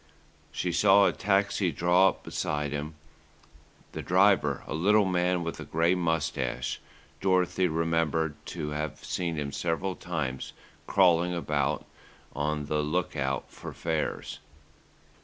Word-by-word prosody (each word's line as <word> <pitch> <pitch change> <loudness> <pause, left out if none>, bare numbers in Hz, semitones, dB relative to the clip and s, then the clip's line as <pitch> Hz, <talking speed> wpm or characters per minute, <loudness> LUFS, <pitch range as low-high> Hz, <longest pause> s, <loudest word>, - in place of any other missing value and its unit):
She 90 - -2
saw 100 +3 +5
a - - +4
taxi 100 -2 +1
draw 90 +5 +4
up - - -8
beside 75 -1 -2
him. 75 +2 -4 1.0
The - - -5
driver, 95 +2 +3
a - - -5
little 100 +6 +4
man 90 -1 +1
with 85 - -5
a - - -5
grey 85 +2 +2
moustache, 80 -7 -1 0.4
Dorothy 95 -1 +2
remembered 80 -1 0
to 75 - -4
have 75 0 -4
seen 85 -2 -2
him 75 -2 -3
several 85 +5 -2
times 75 -7 -4 0.3
"crawling" 90 -2 +3
about 75 -3 -1 0.5
on 75 +1 -1
the 75 +1 -1
look 80 +4 -1
out 65 -3 -2
for - - -9
fares. 80 -2 -3
80 Hz, 130 wpm, -28 LUFS, 75-90 Hz, 1.0 s, saw